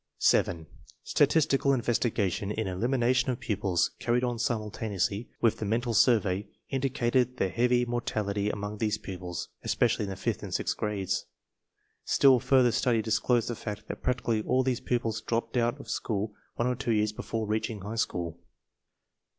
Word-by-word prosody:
7. 80 -2 +2 0.4
Statistical 140 -2 +3
investigation 115 -6 0
in 110 +1 -2
elimination 120 +7 +1
of 125 - -1
pupils, 95 -4 0
carried 120 +1 +1
on 120 -2 -1
simultaneously 105 -2 -2
with 115 - +2
the - - -3
mental 115 +3 0
survey, 105 -4 +3 0.2
indi 135 0 0
cated 125 -1 +1
the 95 - +1
heavy 125 +3 +2
mortality 105 -4 -1
among 105 0 -4
these 110 -2 +1
pupils, 90 -4 -6
espe - - -1
cially - - +1
in 100 - -2
the 95 - -4
fifth - - -2
and - - -4
sixth - - 0
grades. 105 -3 -2 0.8
Still 135 -2 +5
further 130 -1 +4
study 120 -1 +1
disclosed 115 +2 +1
the 120 - -2
fact 105 -1 -6
that - - -5
practically 120 -3 0
all 130 +4 +2
these 130 -2 0
pupils 115 -3 -1
dropped 115 +1 -2
out 120 -1 +1
of - - -10
school 105 -2 -2 0.2
one 120 - 0
or 125 - +2
two 120 -1 -2
years 105 0 +2
before 110 +1 -4
reaching 110 0 -2
high 105 +3 -5
school. 85 -6 -2
115 Hz, 165 wpm, -29 LUFS, 105-120 Hz, 0.8 s, Still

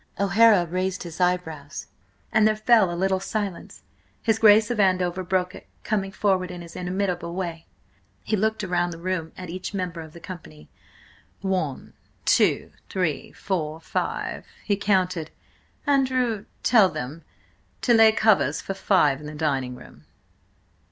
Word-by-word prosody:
O'Hara 200 -1 +5
raised 185 +2 -2
his 170 +1 -7
eyebrows, 160 -5 -1 0.5
and 215 0 +4
there 215 - +2
fell 215 -3 +4
a 170 - -4
little 190 +1 +1
silence. 200 -2 -5 0.4
His 225 -1 +2
Grace 215 0 +6
of 235 - -2
Andover 185 -2 +2
broke 180 0 0
it, - - -12 0.2
coming 195 -3 -1
forward 190 -2 +1
in 180 -1 -7
his 170 - -12
inimitable 180 -1 -2
way. 170 -3 -4 0.6
He 215 - 0
looked 220 +1 0
round 175 -2 0
the 165 - -7
room 170 -2 -3
at 180 -2 -7
each 185 +3 -5
member 180 -3 -3
of 160 -1 -11
the 170 - -11
company. 160 - -11 0.7
"One, 185 -8 -2 0.3
two, - - +3 0.2
three–four, 160 -2 -2
five—" - - -3 0.2
he 205 - +2
counted. 185 -5 0 0.6
"Andrew, 255 -6 +1 0.2
tell 220 -6 +5
them 145 +5 -6 0.6
to 240 - +4
lay 225 -1 +7
covers 210 -10 +3
for 195 - -4
five 180 -8 +2
in 150 - -9
the 150 - -7
dining 135 -5 -1
room." - - -15
185 Hz, 145 wpm, -24 LUFS, 170-205 Hz, 0.7 s, lay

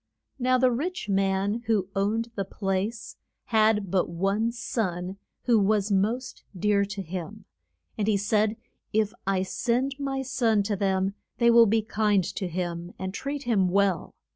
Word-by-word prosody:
Now 255 0 +3
the 255 0 +4
rich 310 - -3
man, 195 +3 +1
who 205 -5 +1
owned 220 +4 0
the 200 - -2
place, 205 +4 -3 0.3
had 215 -4 +2
but 185 -2 +1
one 195 +6 0
son, 195 -6 -3 0.3
who 235 -3 +4
was 205 0 +2
most 220 +6 0
dear 200 +2 +2
to 200 0 -5
him. 190 +4 -7 0.5
And 205 - 0
he 210 -2 +3
said, 210 +2 +1 0.4
If 215 0 +1
I 190 -1 +2
send 245 +7 0
my 270 -1 -2
son 240 -5 +2
to 205 0 -1
them 190 0 0 0.2
they 235 -1 +5
will 230 -1 +7
be 220 +1 +2
kind 210 -3 +2
to 190 +1 -3
him, 175 0 -4
and 190 0 -4
treat 280 +6 -4
him 205 -6 +2
well. 195 -2 +1
210 Hz, 160 wpm, -27 LUFS, 195-230 Hz, 0.5 s, will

